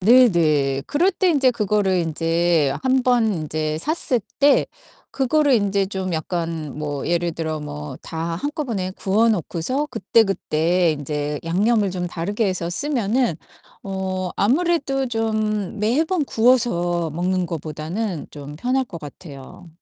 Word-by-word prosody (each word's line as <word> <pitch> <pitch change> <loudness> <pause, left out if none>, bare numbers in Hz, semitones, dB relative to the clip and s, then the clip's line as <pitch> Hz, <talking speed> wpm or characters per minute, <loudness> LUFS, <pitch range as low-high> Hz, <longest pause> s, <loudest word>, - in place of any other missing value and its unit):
네. 245 +6 +7
네. 145 -5 +2
그럴 350 +7 +2
때 370 0 +1
인제 275 -6 +4
그거를 210 -4 +1
인제 165 -2 +1
한 260 0 +3
번 240 -3 +3
인제 155 -1 -2
샀을 270 - 0 0.2
때 285 0 +4 0.4
그거를 280 +1 +2
인제 200 -3 +1
좀 190 -2 -3
약간 160 -3 -3
뭐 145 -2 -3
예를 175 0 0
들어 160 -1 -3
뭐 150 -2 -7
다 165 0 -4
한꺼번에 230 - -3
구워 210 +5 +2
놓고서 215 - -1
그때 215 +4 +3
그때 175 -3 +1
인제 150 0 -3
양념을 205 +4 +2
좀 180 -1 -3
다르게 200 +6 -2
해서 185 -3 -2
쓰면은 245 - 0 0.5
어 190 -1 -3
아무래도 275 - +1
좀 215 -3 -1
매번 300 - +1
구워서 175 - +2
먹는 180 +3 -1
거보다는 165 +3 -4
좀 145 0 -9
편할 255 - 0
것 175 -8 -9
같아요. 145 +2 -11
185 Hz, 255 characters per minute, -22 LUFS, 165-235 Hz, 0.5 s, 네